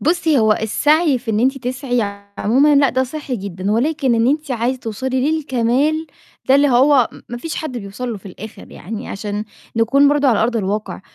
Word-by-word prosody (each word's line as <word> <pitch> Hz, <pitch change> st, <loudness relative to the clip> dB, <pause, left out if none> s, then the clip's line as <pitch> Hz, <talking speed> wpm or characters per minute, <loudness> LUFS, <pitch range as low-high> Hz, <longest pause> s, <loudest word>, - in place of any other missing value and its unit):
بُصي، 320 Hz, -2 st, +2 dB
هو 220 Hz, -1 st, +4 dB
السعي 295 Hz, +7 st, +2 dB
في 235 Hz, -2 st, -5 dB
إن 215 Hz, -, 0 dB
أنتِ 265 Hz, +3 st, +1 dB
تسعي 250 Hz, -1 st, -2 dB, 0.4 s
عمومًا 275 Hz, +7 st, +3 dB
لأ 280 Hz, -1 st, +4 dB
ده 260 Hz, +1 st, 0 dB
صحّي 270 Hz, -1 st, -5 dB
جدًا، 190 Hz, -1 st, -4 dB
ولكن 265 Hz, +1 st, +1 dB
إن 230 Hz, +1 st, +2 dB
أنتِ 300 Hz, 0 st, -1 dB
عايزة 250 Hz, +1 st, -1 dB
توصلي 260 Hz, +5 st, -2 dB
للكمال 290 Hz, +2 st, 0 dB, 0.4 s
ده 265 Hz, -, +6 dB
اللي 285 Hz, +1 st, +4 dB
هو 260 Hz, 0 st, +4 dB, 0.2 s
ما 240 Hz, -, -5 dB
فيش 320 Hz, +6 st, -5 dB
حد 270 Hz, -6 st, -4 dB
بيوصَل 200 Hz, +5 st, -6 dB
له -, -, -5 dB
في 195 Hz, -, -15 dB
الآخر 205 Hz, +3 st, -11 dB
يعني 220 Hz, +5 st, -7 dB
عشان 205 Hz, +1 st, -4 dB, 0.3 s
نكون 270 Hz, +5 st, +4 dB
برضو 290 Hz, -1 st, +2 dB
على 225 Hz, -4 st, +3 dB
أرض 235 Hz, +1 st, 0 dB
الواقع، 210 Hz, +1 st, -3 dB
250 Hz, 190 wpm, -18 LUFS, 225-285 Hz, 0.4 s, ده